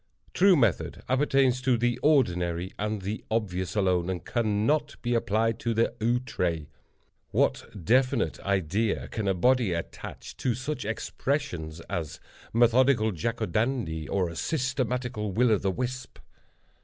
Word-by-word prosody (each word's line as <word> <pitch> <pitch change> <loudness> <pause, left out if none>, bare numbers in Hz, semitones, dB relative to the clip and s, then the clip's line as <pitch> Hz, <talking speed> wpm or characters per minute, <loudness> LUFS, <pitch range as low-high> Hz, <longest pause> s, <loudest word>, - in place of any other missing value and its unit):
True 190 0 +6
method 115 - +1
appertains 130 -1 +2
to 130 -2 +2
the 120 +1 0
ordinary 90 - +1
and 105 -1 -2
the 105 +3 -4
obvious 95 -5 -2
alone, 90 -3 +1
and 90 -2 -4
cannot 120 +7 0
be 120 0 0
applied 115 0 +1
to 115 -1 -1
the 115 - +2
outré. 110 -9 -1 0.6
What - - +1 0.2
definite 130 +2 +2
idea 100 +3 0
can 110 -3 -3
a 95 - +2
body 125 0 +3
attach 85 -1 -7
to 125 -3 0
such 130 +1 -4
expressions 105 - -3
as 80 -2 -5 0.3
"methodical 120 -1 +4
Jack 115 +7 -2
o' - - +2
Dandy," 110 - -1
or 95 -3 +1
"a 85 - -7
systematical 125 - -2
Will 120 +3 +3
o' 105 - +3
the 100 - 0
Wisp"? 125 +4 -4
115 Hz, 140 wpm, -27 LUFS, 95-130 Hz, 0.6 s, True